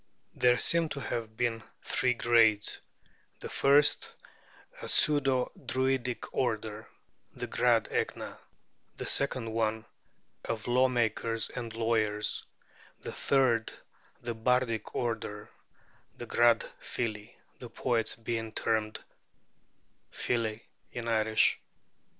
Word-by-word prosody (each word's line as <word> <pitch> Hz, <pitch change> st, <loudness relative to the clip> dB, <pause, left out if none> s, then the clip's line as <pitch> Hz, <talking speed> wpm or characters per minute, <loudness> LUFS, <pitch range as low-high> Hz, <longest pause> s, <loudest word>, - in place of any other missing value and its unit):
There 125 Hz, 0 st, +4 dB
seem 165 Hz, +6 st, +2 dB
to 140 Hz, -, -5 dB
have 115 Hz, -4 st, -4 dB
been 115 Hz, -2 st, 0 dB, 0.2 s
three 125 Hz, -1 st, +1 dB
grades: 115 Hz, -3 st, +3 dB, 0.6 s
the -, -, -6 dB
first, 145 Hz, +1 st, +4 dB, 0.7 s
a -, -, -6 dB
pseudo 135 Hz, -4 st, +3 dB
Druidic 130 Hz, -1 st, -1 dB
order, 110 Hz, -3 st, -2 dB, 0.5 s
the -, -, -4 dB
Gradh -, -, +3 dB
Ecna; -, -, -3 dB, 0.6 s
the -, -, -5 dB
second, 130 Hz, -5 st, -1 dB
one 110 Hz, 0 st, -1 dB, 0.6 s
of 110 Hz, 0 st, -4 dB
law 125 Hz, +2 st, +4 dB
makers 115 Hz, -2 st, 0 dB
and 120 Hz, -2 st, -6 dB
lawyers; 110 Hz, -2 st, +1 dB, 0.6 s
the -, -, -6 dB
third, 125 Hz, -5 st, +2 dB, 0.5 s
the 120 Hz, 0 st, -3 dB
Bardic 115 Hz, -1 st, 0 dB
order, 115 Hz, -3 st, -3 dB, 0.7 s
the 120 Hz, -, -6 dB
Gradh 120 Hz, 0 st, +3 dB
Fili, 110 Hz, -2 st, -4 dB, 0.2 s
the 125 Hz, -, -8 dB
poets 115 Hz, -1 st, 0 dB
being 115 Hz, -1 st, -4 dB
termed 110 Hz, -1 st, -1 dB, 1.1 s
File 115 Hz, -3 st, -1 dB, 0.3 s
in 120 Hz, -1 st, -5 dB
Irish. 110 Hz, -1 st, +3 dB
115 Hz, 105 wpm, -30 LUFS, 110-125 Hz, 1.1 s, There